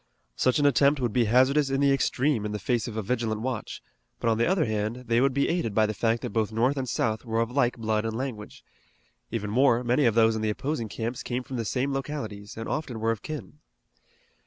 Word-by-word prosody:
Such 130 +3 +2
an 145 - +2
attempt 140 +1 +4
would 120 -4 -1
be 120 -2 +3
hazardous 130 +5 +3
in 135 0 0
the 140 0 +4
extreme 135 -2 +1
in 105 0 -3
the - - -1
face 115 +3 -1
of 110 -2 -6
a 110 - -2
vigilant 110 -1 -1
watch; 120 -3 -4 0.4
but 115 - +1
on 110 - 0
the 115 - +3
other 185 -3 +2
hand 110 +2 -2
they 115 0 +2
would 135 +1 +3
be 140 +2 +1
aided 165 - -1
by 110 - +4
the 110 - -2
fact 115 +2 0
that - - -3
both 110 0 0
North 120 +6 +1
and 130 -3 -3
South 110 -1 -1
were 115 -2 -1
of 115 +1 0
like 125 -2 +1
blood 110 -1 0
and 110 0 -3
language. 120 -5 -6 0.7
Even 105 -2 -3
more, 125 0 +3
many 125 +4 +2
of 115 -2 +3
those 115 -1 +4
in 110 - -2
the 110 - 0
opposing 120 +1 -3
camps 115 +3 -4
came 125 +1 -3
from 130 0 -6
the 115 - -2
same 135 +5 -1
localities, 115 -8 -5
and 115 - -5
often 135 -7 -3
were 115 +1 +1
of 110 -2 -4
kin. 150 -1 -7
120 Hz, 240 wpm, -27 LUFS, 110-135 Hz, 0.7 s, attempt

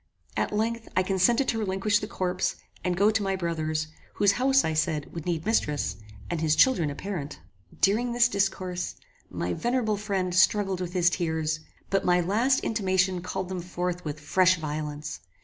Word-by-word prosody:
At - - 0
length, 225 +2 -1
I 185 - +5
consented 195 +8 +2
to 225 - 0
relinquish 205 0 +1
the 210 - -5
corpse, 185 -3 -1 0.3
and 180 -1 0
go 205 +3 +5
to 220 0 0
my 195 -1 0
brother's, 155 -3 -1 0.3
whose 205 -1 +4
house, 265 +5 +3
I 160 - 0
said, 155 -1 -1
would 165 0 -6
need 165 -1 -1
mistress, 150 -10 0 0.3
and 170 -2 -2
his 155 -1 +3
children 180 - +4
a 140 - -5
parent. 160 -7 -5 0.4
During 225 +5 +3
this 235 0 +4
discourse, 185 -4 -1 0.3
my 90 0 -2
venerable 235 - 0
friend 195 -3 -2
struggled 190 0 +3
with 175 -1 -4
his 180 -1 +3
tears, 160 -3 -1 0.3
but 195 0 +2
my 180 0 +3
last 225 +10 +2
intimation 190 -4 +1
called 180 +1 -4
them 185 -1 -4
forth 180 0 -3
with 150 0 -5
fresh 185 +5 +3
violence. 150 -1 -4
185 Hz, 175 wpm, -27 LUFS, 165-210 Hz, 0.4 s, I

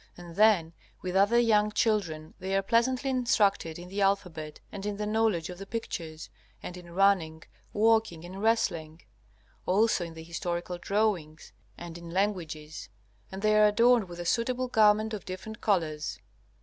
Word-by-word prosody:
And 175 -1 -11
then 200 -6 +4 0.3
with 185 0 -3
other 205 +5 +4
young 210 -3 +3
children 190 -10 -1
they 190 +1 -2
are 195 - +2
pleasantly 255 +5 +1
instructed 205 -9 +1
in 175 +1 -9
the 200 +2 -4
alphabet, 180 -6 -1
and 200 -2 -7
in 205 0 -3
the 210 - -3
knowledge 210 -6 0
of 180 - -10
the 195 - -8
pictures, 165 -8 -5 0.4
and 180 - -6
in 175 -1 -11
running, 180 -5 +2 0.3
walking, 220 -6 +2
and 190 +3 -8
wrestling; 170 -8 0 0.6
also 200 0 +2
in 165 -1 -8
the 160 - -9
historical 175 +1 -4
drawings, 185 -6 -1 0.2
and 170 0 -8
in 170 0 -10
languages; 165 - -3 0.4
and 190 +2 -7
they 215 0 +4
are 210 - +7
adorned 230 -1 +3
with 175 0 -9
a 175 - -5
suitable 250 +5 0
garment 215 -1 +3
of 210 - -5
different 215 +4 -8
colors. 155 -7 -1
195 Hz, 160 wpm, -28 LUFS, 170-215 Hz, 0.6 s, are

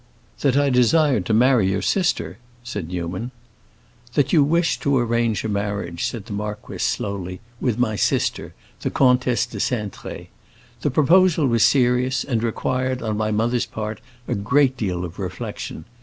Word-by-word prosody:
"That 135 -1 +2
I 145 -1 +3
desired 125 - +3
to - - +1
marry 120 -4 +4
your 95 0 -1
sister?" 140 - 0 0.2
said 105 -8 -5
Newman. 90 +6 -4 0.9
"That 140 -2 +2
you 155 -4 +6
wished 165 +3 +1
to 140 -1 +2
arrange 115 -2 +1
a - - -2
marriage," 100 -4 -2
said 110 -5 -4
the - - -7
marquis, 105 +1 -5
slowly, 90 -2 -2 0.2
"with 120 -4 0
my 120 -3 +1
sister, - - 0 0.2
the - - -2
Comtesse 125 -2 +3
de 120 - -8
Cintré. 105 -5 -4 0.5
The - - +1
proposal 160 +3 +4
was 115 -3 +3
serious, 125 0 +3
and 120 -5 -1
required, 130 +2 -1
on 110 -1 -1
my 110 0 -1
mother's 115 +3 0
part, 110 -1 -5 0.3
a - - -1
great 130 +6 +2
deal 90 -7 -2
of 90 +3 -9
reflection. 90 -3 -6
115 Hz, 155 wpm, -22 LUFS, 105-130 Hz, 0.9 s, you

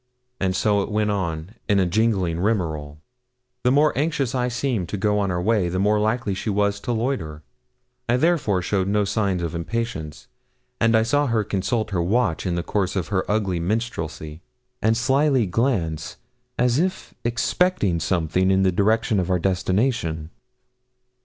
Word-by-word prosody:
And 95 -1 0
so 105 -1 +2
it - - -4
went 105 0 +1
on, 85 -3 -3 0.2
in 100 -1 +4
a 95 - +3
gingling 95 -3 +1
rigmarole. 80 -8 -1 0.7
The 125 - +3
more 150 +3 +3
anxious 140 -3 0
I 125 -1 0
seemed 120 -7 -2
to 105 - -3
go 105 +1 +1
on 100 -1 0
our 90 -1 -1
way, 100 -1 +1
the 90 - -2
more 105 +2 +2
likely 110 -1 0
was 100 0 +1
she - - -13
to - - -1
loiter. 105 - -2 0.7
I 120 - +4
therefore 130 - +1
showed 95 +1 0
no 105 +1 +1
signs 100 -4 0
of 85 - -3
impatience, 85 -4 -4 0.5
and 115 0 +3
I 110 - +3
saw 145 +5 +1
her 115 -3 +1
consult 105 +3 -1
her 90 -3 0
watch 95 -1 0
in 90 - 0
the 85 - -2
course 95 +1 -1
of 95 -3 -2
her 95 -3 -1
ugly 100 -4 0
minstrelsy, 85 -6 -3 0.4
and 110 +1 +2
slyly 135 0 +2
glance, 90 - -1 0.4
as 125 +2 +2
if 185 +2 -2
expecting 120 - +1
something, 90 +2 +1
in 95 0 +3
the 95 - +3
direction 110 +3 +2
of 90 0 -2
our 90 - +3
destination. 90 -3 0
100 Hz, 170 wpm, -23 LUFS, 90-115 Hz, 0.7 s, in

